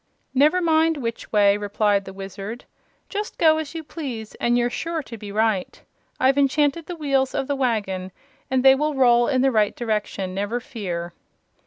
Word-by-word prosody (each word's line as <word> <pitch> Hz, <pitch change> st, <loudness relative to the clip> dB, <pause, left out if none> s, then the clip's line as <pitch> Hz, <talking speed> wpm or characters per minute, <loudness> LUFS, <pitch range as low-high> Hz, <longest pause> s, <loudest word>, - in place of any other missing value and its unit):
"Never 300 Hz, +7 st, +4 dB
mind 320 Hz, -1 st, +3 dB
which 230 Hz, -4 st, -5 dB
way," 205 Hz, -1 st, +4 dB
replied 205 Hz, -1 st, 0 dB
the 190 Hz, -, -8 dB
Wizard. 195 Hz, +4 st, -7 dB, 0.4 s
"Just 420 Hz, +2 st, -5 dB
go 315 Hz, -1 st, +4 dB
as 315 Hz, +1 st, -6 dB
you 325 Hz, -, -4 dB
please 255 Hz, -9 st, -6 dB
and 240 Hz, 0 st, +2 dB
you're 240 Hz, 0 st, +2 dB
sure 330 Hz, +1 st, -3 dB
to 235 Hz, -, -9 dB
be 210 Hz, -2 st, -8 dB
right. 215 Hz, -3 st, 0 dB, 0.4 s
I've 265 Hz, +2 st, +3 dB
enchanted 290 Hz, +3 st, +1 dB
the 355 Hz, -, -5 dB
wheels 275 Hz, -4 st, 0 dB
of -, -, 0 dB
the 285 Hz, -, -1 dB
wagon, 205 Hz, -8 st, -1 dB, 0.4 s
and 260 Hz, 0 st, +1 dB
they 265 Hz, -, +9 dB
will 300 Hz, +2 st, 0 dB
roll 240 Hz, -2 st, +4 dB
in 260 Hz, -3 st, +2 dB
the 270 Hz, -, +4 dB
right 215 Hz, -3 st, +2 dB
direction, 210 Hz, -5 st, -2 dB
never 205 Hz, +5 st, -2 dB
fear." 175 Hz, -8 st, -5 dB
245 Hz, 180 wpm, -23 LUFS, 205-290 Hz, 0.4 s, they